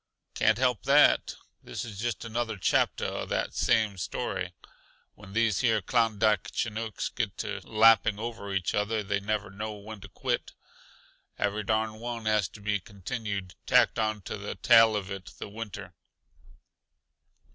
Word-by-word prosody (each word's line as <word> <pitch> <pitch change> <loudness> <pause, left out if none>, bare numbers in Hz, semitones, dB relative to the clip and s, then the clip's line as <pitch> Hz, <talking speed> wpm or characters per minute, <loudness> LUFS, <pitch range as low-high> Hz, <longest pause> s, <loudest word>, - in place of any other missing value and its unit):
"Can't 110 0 +3
help 125 -2 +1
that. 145 +2 +5 0.3
This - - -6
is 105 -4 -8
just 120 0 -2
another 115 -1 -2
chapter 90 - +1
uh - - -3
that - - -1
same 110 -4 +2
story. - - -3 0.6
When 100 -2 -14
these 115 -3 +2
here 115 -4 +3
Klondike 110 0 +2
Chinooks 110 -1 -3
gets - - -2
to - - -4
lapping 110 -1 +5
over 110 -2 -5
each 95 -3 -1
other 105 +1 0
they 100 0 -1
never 105 -1 -2
know 105 +2 -5
when 105 0 -10
to 100 - -11
quit. - - -2 0.8
Every 105 +1 0
darn 110 +1 0
one 120 -1 -5
has 105 -3 +2
got - - -26
to 105 - -11
be 105 0 0
continued 100 -1 -5
tacked - - +4
onto 110 -3 -2
the - - -5
tail 115 -2 +6
of 100 -2 -3
it 95 -2 -7
the - - -6
winter. 100 -3 -7
110 Hz, 155 wpm, -28 LUFS, 100-115 Hz, 0.8 s, tail